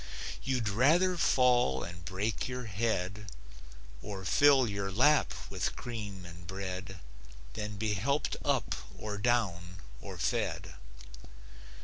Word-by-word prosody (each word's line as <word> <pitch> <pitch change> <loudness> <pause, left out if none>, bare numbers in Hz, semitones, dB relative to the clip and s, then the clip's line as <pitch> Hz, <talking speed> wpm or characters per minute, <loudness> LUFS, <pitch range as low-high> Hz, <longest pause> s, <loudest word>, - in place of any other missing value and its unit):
You'd 125 -4 -1
rather 155 - +4
fall 125 - +3
and 85 0 -8
break 95 +6 -2
your 125 0 -4
head, 100 -2 -2 0.7
Or 100 -2 -6
fill 135 +3 +5
your 100 -2 -2
lap 145 +9 +4 0.2
with - - -2
cream 105 -6 -6
and 85 0 -11
bread 95 -1 -5 0.5
Than 105 +6 -5
be 110 0 0
helped 140 +9 0
up - - +1 0.2
or 105 -1 -5
down, 95 -7 0 0.3
or - - -8
fed. - - -1
105 Hz, 115 wpm, -31 LUFS, 95-125 Hz, 0.7 s, fill